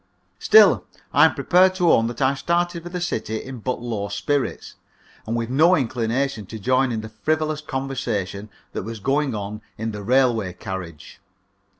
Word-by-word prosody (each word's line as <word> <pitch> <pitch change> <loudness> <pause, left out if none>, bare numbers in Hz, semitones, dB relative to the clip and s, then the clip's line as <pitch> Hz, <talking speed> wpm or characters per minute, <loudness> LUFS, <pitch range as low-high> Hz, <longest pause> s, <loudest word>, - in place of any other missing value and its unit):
Still, 435 - +6 0.3
I - - +7
am - - +2
prepared 185 +1 +4
to 180 -3 +3
own 115 - +4
that 120 +3 -3
I 130 +1 +3
started 170 +4 -1
for 175 - -8
the 180 0 -4
city 110 -10 -2
in 130 +1 -7
but 125 +1 -3
low 110 -4 -3
spirits, 135 +8 -2 0.5
and 115 - -1
with 115 0 -2
no 160 +7 +5
inclination 120 - -1
to 110 - -7
join 130 +4 +1
in 110 -2 -2
the 110 - -8
frivolous 155 +7 -1
conversation 125 -9 -3 0.2
that - - -3
was 115 +2 -7
going 135 +2 0
on 105 +1 -5 0.2
in 110 +1 -3
the 105 -1 -6
railway 115 -4 +2
carriage. 90 -4 -8
125 Hz, 175 wpm, -22 LUFS, 110-145 Hz, 0.5 s, I